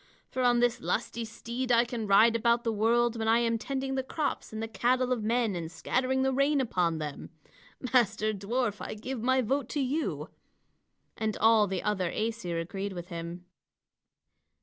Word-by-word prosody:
For 260 - -2
on 245 -1 +4
this 245 -1 +1
lusty 235 0 -2
steed 235 +3 -4
I 235 0 +5
can 230 -3 -4
ride 220 +4 +6
about 235 +1 +2
the 230 - 0
world 235 +2 +2
when 220 - -1
I 225 +1 +5
am 230 -1 +1
tending 270 +2 -3
the 265 - 0
crops 290 +3 -3
and 220 - -5
the 225 - -3
cattle 250 +3 +1
of 245 -3 +1
men 225 -1 +1
and 165 -2 -5
scattering 260 +9 0
the 265 0 +1
rain 280 +2 +2
upon 180 -10 0
them. 150 -2 -6 0.6
Master 215 -3 +3
dwarf, 210 +2 -1
I - - -5
give 235 +3 -5
my 260 +2 +2
vote 270 +2 -1
to 295 - -2
you." 280 +4 -2 0.9
And 220 -1 -1
all 220 -1 +5
the 190 -1 -3
other 190 -4 0
Æsir 215 -6 -2
agreed 195 +4 -4
with 175 -1 -7
him. 170 +1 -6
230 Hz, 180 wpm, -29 LUFS, 205-255 Hz, 0.9 s, ride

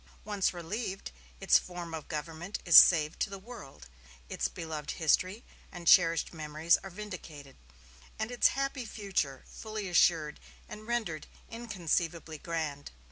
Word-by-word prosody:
Once 205 -2 0
relieved, 190 +3 -5 0.3
its - - +5
form 175 -2 -8
of 160 -2 -6
government 165 +5 -5
is 170 - +4
saved 155 -3 +8
to - - 0
the 195 - -7
world, 195 - -12 0.4
its - - -1
beloved 155 -3 -7
history 185 +7 +1 0.3
and 175 -2 -9
cherished 165 -2 +5
memories 155 +1 +1
are 195 - -10
vindicated, 175 -8 -9 0.6
and 220 +2 -3
its 245 - +4
happy 275 -1 -2
future 195 - -3
fully 215 -2 -6
assured 165 -4 +2 0.3
and 215 +1 -10
rendered 220 -10 -2 0.2
inconceivably 170 -8 -3
grand. 155 -4 -4
175 Hz, 135 wpm, -30 LUFS, 160-210 Hz, 0.6 s, saved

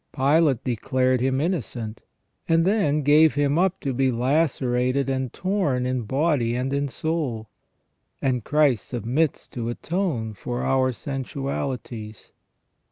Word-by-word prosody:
Pilate 140 -1 +3
declared 130 +1 +1
Him 130 +1 +1
innocent, 125 - -3 0.5
and 165 0 +4
then 155 -8 +2
gave 150 +2 +5
Him 145 +2 +2
up 190 0 +1
to 135 - -2
be 135 +1 +2
lacerated 130 0 +1
and 130 -2 -2
torn 185 -10 0
in 125 -2 -1
body 135 -2 +1
and 130 +2 -2
in 140 0 0
soul; 140 -7 -3 0.7
and 125 -4 0
Christ 150 -4 +2
submits 130 +6 -1
to 120 -2 -4
atone 140 - -2
for 120 +4 -4
our 130 -1 +2
sensualities. 130 -4 -5
135 Hz, 125 wpm, -24 LUFS, 125-150 Hz, 0.7 s, gave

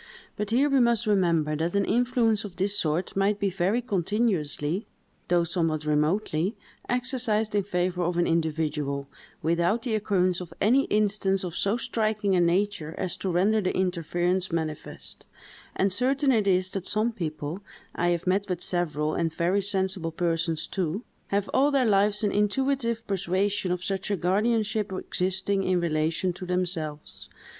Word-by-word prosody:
But 210 -1 -3
here 255 +6 +3
we 275 -2 +3
must 235 -1 +3
remember 170 -7 +2
that 165 +4 -1
an 200 -1 +2
influence 235 -3 +2
of 200 -4 -8
this 195 +3 0
sort 165 0 -1
might 200 +1 +1
be 200 -2 0
very 195 +7 0
continuously, 190 -5 -1 0.4
though 175 -1 +3
somewhat 165 -3 -1
remotely, 155 +5 +1 0.3
exercised 245 -4 0
in 205 - +3
favor 180 -2 -1
of 175 0 0
an 175 - +3
individual, 150 -4 -1 0.4
without 170 +7 +1
the 240 -4 -2
occurrence 185 -4 +1
of 175 - -9
any 255 +7 +4
instance 200 -2 +1
of 175 -2 -5
so 200 +4 +1
striking 215 -4 0
a 180 - +3
nature 175 -2 0
as 185 - -2
to 190 - -3
render 200 +5 +2
the 185 - -1
interference 180 0 0
manifest; 160 -2 -4 0.5
and 195 -1 +1
certain 270 +5 +2
it 215 -5 +2
is 185 0 +2
that 195 -2 -4
some 215 +3 +2
people—I 170 -1 -5
have 175 -1 0
met 195 +2 +1
with 180 -2 -1
several, 155 -4 -1
and 165 -1 0
very 175 +5 +1
sensible 190 -3 -1
persons 165 -1 -1
too—have 200 +2 -3
all 280 +2 +4
their 275 -3 +2
lives 205 0 +2
an 205 - +2
intuitive 235 +2 0
persuasion 195 0 0
of 180 0 -2
such 195 +1 -2
a 205 - +1
guardianship 215 +3 +1
existing 190 +1 -1
in 185 -1 +1
relation 165 +2 0
to 185 0 -8
themselves. 175 -4 -3
190 Hz, 155 wpm, -26 LUFS, 170-210 Hz, 0.5 s, any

